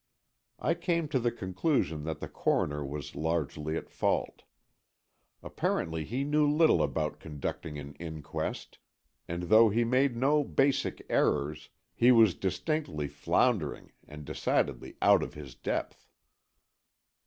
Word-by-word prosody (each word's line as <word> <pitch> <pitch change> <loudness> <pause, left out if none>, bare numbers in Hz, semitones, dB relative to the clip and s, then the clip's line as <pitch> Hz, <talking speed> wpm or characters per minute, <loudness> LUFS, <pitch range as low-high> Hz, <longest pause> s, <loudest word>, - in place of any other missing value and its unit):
I - - +1
came 170 -3 -1
to 135 - +1
the 120 0 +1
conclusion 95 - -1
that 80 -1 -4
the - - -4
Coroner 75 0 0
was 70 0 -6
largely 80 -1 -2
at - - -6
fault. - - -1 1.0
Apparently 80 -1 -2
he 125 - -2
knew 150 +1 +2
little 155 +1 +4
about 75 +2 -1
conducting 75 0 -5
an 70 0 -8
inquest, 80 -3 -5 0.5
and 85 +1 -4
though 110 +5 +6
he 115 +3 +2
made 125 +1 +2
no 145 +4 +3
basic 135 0 0
errors, 75 +1 0 0.2
he 120 +2 +5
was 115 -6 +6
distinctly 90 - -2
floundering 100 - 0 0.2
and 75 0 -10
decidedly - - -1
out - - +6
of - - -5
his 70 -4 -9
depth. - - -4
85 Hz, 130 wpm, -30 LUFS, 75-125 Hz, 1.0 s, though